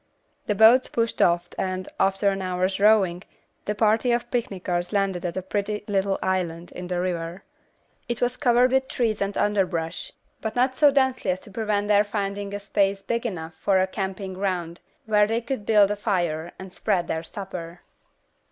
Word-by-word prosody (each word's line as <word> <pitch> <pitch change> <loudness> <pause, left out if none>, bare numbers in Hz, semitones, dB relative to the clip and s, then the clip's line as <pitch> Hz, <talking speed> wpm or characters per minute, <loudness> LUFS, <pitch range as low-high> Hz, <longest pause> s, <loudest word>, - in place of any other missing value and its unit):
The 210 - +1
boats 225 +5 +6
pushed 230 -1 -1
off 175 0 +3
and, 185 0 -2
after 195 +1 +2
an 195 0 -2
hour's 185 +1 -1
rowing, 200 -4 +4 0.4
the 210 - -1
party 220 +3 +2
of 240 0 -1
picnickers 180 -7 -2
landed 195 -4 0
at 175 0 -3
a 185 - -2
pretty 205 +2 -2
little 195 -1 +1
island 175 -2 -2
in 180 - -7
the 180 -1 -2
river. 175 0 -3 0.7
It 240 - -2
was 245 0 0
covered 250 -2 +3
with 265 0 +2
trees 225 -6 -1
and 200 0 -1
underbrush, 190 - -1 0.3
but 220 - -3
not 255 +1 +2
so 295 +2 +6
densely 265 -6 +1
as 185 0 0
to 205 - -13
prevent 210 -1 -1
their 205 0 +5
finding 200 -1 -3
a - - -3
space 200 -1 0
big 235 +1 -1
enough 165 -6 -6
for 195 -2 +3
a 185 - +3
camping 190 0 -4
ground 185 -3 -3 0.3
where 210 -1 +4
they 225 +1 0
could 240 -3 -5
build 210 -2 +5
a - - 0
fire 175 -6 -1
and 190 -1 -10
spread 190 -5 0
their 160 - -2
supper. 175 -1 -7
200 Hz, 180 wpm, -25 LUFS, 185-220 Hz, 0.7 s, boats